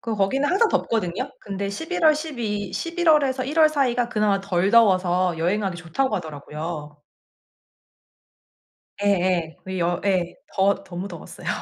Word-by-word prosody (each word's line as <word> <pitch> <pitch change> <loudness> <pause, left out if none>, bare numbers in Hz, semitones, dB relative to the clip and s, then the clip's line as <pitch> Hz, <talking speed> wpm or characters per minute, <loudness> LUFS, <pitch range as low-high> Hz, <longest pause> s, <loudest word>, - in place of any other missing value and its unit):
그 230 -2 -3
거기는 215 +8 +1
항상 400 +5 +3
덥거든요. 225 - -1
근데 200 0 -4
11월, 320 - +2
12 225 - -4
11월 335 -3 +2
에서 260 -1 -1
1월 310 +2 +4
사이가 250 -5 +1
그나마 210 -3 +1
덜 195 -1 0
더워서 185 -5 +4
여행하기 190 +2 0
좋다고 180 +11 -1
하더라고요. 150 -1 -6 2.1
예예. 180 -5 +1
그 190 0 -5
여 175 +1 0
예 180 -3 +1 0.2
더 195 +1 +1
너무 180 +2 -6
더웠어요. 170 -4 -9
200 Hz, 265 characters per minute, -23 LUFS, 175-260 Hz, 2.1 s, 1월